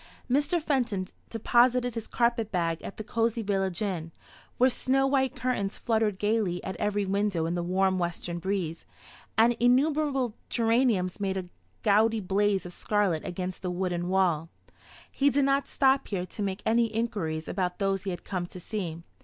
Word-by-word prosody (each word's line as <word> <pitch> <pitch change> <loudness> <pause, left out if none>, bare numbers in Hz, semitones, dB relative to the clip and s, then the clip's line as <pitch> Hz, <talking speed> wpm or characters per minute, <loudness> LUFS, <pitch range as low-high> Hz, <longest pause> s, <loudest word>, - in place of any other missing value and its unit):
Mr. 285 +6 +2
Fenton 245 - 0 0.2
deposited 245 +2 +3
his 225 -1 -5
carpet 235 -2 +1
bag 165 -3 0
at - - -8
the 215 - -5
cosy 230 +1 0
village 195 -1 -1
inn, 170 -5 -3 0.5
where 255 - +5
snow 265 +1 +2
white 265 -1 +1
curtains 210 -6 -1
fluttered 220 -4 +1
gaily 205 -3 +1
at 190 - -4
every 205 -1 0
window 195 -3 0
in 165 - -1
the 175 - -1
warm 185 +2 +1
western 175 0 -3
breeze, 170 -3 -3 0.5
and 230 +2 +6
innumerable 270 0 +2 0.2
geraniums 225 -6 +2
made 195 -1 -1
a 180 -2 -5 0.3
gaudy 220 +1 +4
blaze 200 0 +1
of 175 - -7
scarlet 200 -7 0
against 185 0 -4
the 185 - -2
wooden 175 -1 -2
wall. 175 -4 +2 0.6
He 285 +1 +3
did 280 0 +2
not 275 0 +2
stop 270 0 +2
here 185 -3 -2
to 185 - -8
make 195 0 -2
any 230 +1 +3
inquiries 205 -9 -2
about 180 -2 -2
those 195 -2 0
he 195 - -4
had 175 - -5
come 180 -3 -3
to 180 - -10
see. 175 -4 -4
205 Hz, 170 wpm, -28 LUFS, 180-235 Hz, 0.6 s, and